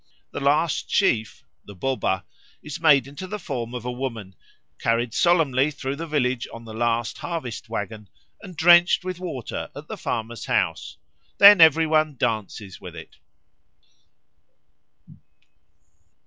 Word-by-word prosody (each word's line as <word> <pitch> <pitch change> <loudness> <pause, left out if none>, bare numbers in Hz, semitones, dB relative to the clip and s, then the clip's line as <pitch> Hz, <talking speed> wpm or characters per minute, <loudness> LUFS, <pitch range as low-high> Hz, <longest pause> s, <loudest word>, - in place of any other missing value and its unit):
The - - -5
last 150 +4 +1
sheaf 125 - 0 0.2
the 100 - -13
Boba 95 -3 -1 0.4
is 150 +2 -7
made 150 -4 +5
into 145 +7 -9
the 210 - -5
form 125 - -5
of 120 -1 -6
a 125 - -2
woman, 115 -6 -6 0.5
carried 115 0 0
solemnly 150 -6 +2
through 140 -2 -5
the 165 +3 -6
village 130 -5 -1
on 115 0 -10
the 110 - -9
last 115 0 -1
harvest 155 -10 -6
waggon, 105 0 -6 0.3
and 185 -6 -11
drenched 175 +3 +5
with 185 -1 -5
water 160 -10 -6
at - - -10
the - - -7
farmer's 115 +1 -4
house; - - -1 0.4
then 200 -2 +9
every 160 0 +6
one 155 -1 +1
dances 105 -4 -3
with 90 -2 -10
it. 80 -1 -12
135 Hz, 135 wpm, -23 LUFS, 115-160 Hz, 0.5 s, then